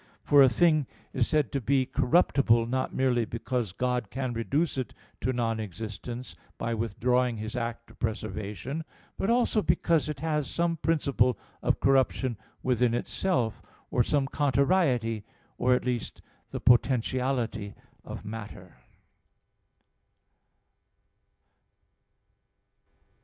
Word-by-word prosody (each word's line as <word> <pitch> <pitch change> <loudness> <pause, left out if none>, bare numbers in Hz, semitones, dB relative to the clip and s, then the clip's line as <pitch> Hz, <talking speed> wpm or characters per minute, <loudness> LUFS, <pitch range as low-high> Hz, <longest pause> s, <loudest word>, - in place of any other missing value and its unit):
For 145 -1 +6
a 135 - +8
thing 155 -1 +3 0.3
is 125 -3 +1
said 150 -7 +1
to 140 - -1
be 130 +2 +2
corruptible 135 -4 +3
not 130 +2 -1
merely 125 -3 +2
because 115 -1 -3
God 125 +1 -1
can 130 0 -3
reduce 140 +8 0
it 130 - -5 0.2
to 130 - 0
non 115 -3 -1
existence, 110 +5 -6 0.2
by 115 - -2
withdrawing 120 +2 0
His 110 +2 -5
act 115 -1 -4
of - - -20
preservation; 110 - -4 0.3
but 195 - -1
also 235 -2 +3
because 165 -4 +2
it 150 -3 -4
has 150 -3 -1
some 170 -1 0
principle 140 -7 +1 0.2
of - - +1
corruption 130 -2 +2 0.3
within 125 -2 +2
itself, 120 - -1 0.3
or 125 - +3
some 140 +3 +1
contrariety, 135 - +1 0.4
or 125 +1 +4
at - - -2
least 125 -3 -3 0.3
the - - -4
potentiality 120 -3 +1 0.3
of - - -8
matter. 105 - -8
125 Hz, 115 wpm, -28 LUFS, 115-140 Hz, 0.4 s, a